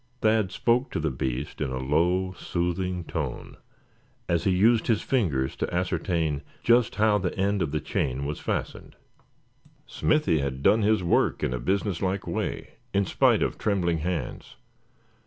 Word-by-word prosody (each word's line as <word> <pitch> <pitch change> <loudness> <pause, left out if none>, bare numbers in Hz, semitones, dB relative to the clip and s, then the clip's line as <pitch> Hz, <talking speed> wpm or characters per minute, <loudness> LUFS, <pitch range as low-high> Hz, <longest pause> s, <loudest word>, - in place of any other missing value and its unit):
Thad 110 -3 +3
spoke 120 +6 +1
to - - -1
the 80 -2 -1
beast 65 +2 -4
in 75 - 0
a 65 - -3
low, 85 +8 +1
soothing 90 +1 -2
tone, 75 -6 -5 0.7
as 85 -1 0
he - - +3
used 110 +5 +3
his 110 -3 +1
fingers 75 - 0
to - - -2
ascertain 85 -4 -1 0.2
just 120 0 +3
how 105 0 +3
the 90 -2 -3
end 100 +1 +1
of 80 - 0
the 75 - 0
chain 70 -1 -2
was 75 +1 -4
fastened. - - -4 0.9
Smithy 150 - +1
had 70 -1 -3
done 110 - +5
his 105 -2 +2
work 85 - +1
in 60 - 0
a 60 - -2
business 95 - -1
like 95 +1 -1
way, - - -4 0.2
in 100 0 +3
spite - - +3
of - - -2
trembling 90 -6 +1
hands. 80 -5 -4
90 Hz, 160 wpm, -26 LUFS, 75-100 Hz, 0.9 s, done